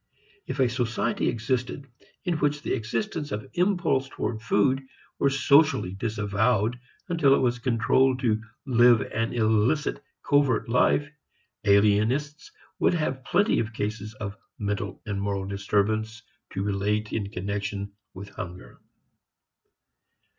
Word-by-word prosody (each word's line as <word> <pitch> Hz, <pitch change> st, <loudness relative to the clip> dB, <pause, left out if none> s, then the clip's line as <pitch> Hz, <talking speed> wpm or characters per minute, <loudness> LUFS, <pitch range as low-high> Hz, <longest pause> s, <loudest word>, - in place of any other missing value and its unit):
If -, -, -4 dB
a 130 Hz, -, +4 dB
society 120 Hz, -1 st, -1 dB
existed 125 Hz, +3 st, -2 dB, 0.4 s
in 175 Hz, -3 st, 0 dB
which 150 Hz, 0 st, 0 dB
the -, -, -1 dB
existence 145 Hz, -, -3 dB
of 105 Hz, +5 st, -4 dB
impulse 175 Hz, -8 st, +1 dB
toward 110 Hz, -4 st, -4 dB
food 115 Hz, +4 st, +2 dB, 0.4 s
were 140 Hz, -, +3 dB
socially 140 Hz, -, +3 dB
disavowed 110 Hz, +2 st, 0 dB, 0.3 s
until 150 Hz, -6 st, +4 dB
it -, -, +1 dB
was 125 Hz, -1 st, +1 dB
compelled 125 Hz, +2 st, +2 dB
to 110 Hz, -4 st, +1 dB, 0.2 s
live 120 Hz, -3 st, +5 dB
an 115 Hz, +1 st, -2 dB
illicit, 110 Hz, -, +1 dB, 0.2 s
covert 140 Hz, -5 st, +2 dB
life, 125 Hz, +4 st, +3 dB, 0.6 s
alienists 110 Hz, -, +2 dB, 0.3 s
would -, -, +3 dB
have 135 Hz, -5 st, -2 dB
plenty 200 Hz, -, +2 dB
of 110 Hz, 0 st, -2 dB
cases 105 Hz, 0 st, -4 dB
of 100 Hz, -2 st, -6 dB, 0.2 s
mental 100 Hz, -1 st, -3 dB
and 100 Hz, -3 st, -3 dB
moral 100 Hz, -1 st, -2 dB
disturbance 105 Hz, +3 st, -1 dB, 0.3 s
to 95 Hz, -, -2 dB
relate 105 Hz, +2 st, -1 dB
in 100 Hz, -3 st, -2 dB
connection 100 Hz, +1 st, -4 dB, 0.2 s
with 100 Hz, +2 st, -8 dB
hunger. 90 Hz, -2 st, -9 dB
115 Hz, 125 wpm, -26 LUFS, 105-135 Hz, 0.6 s, live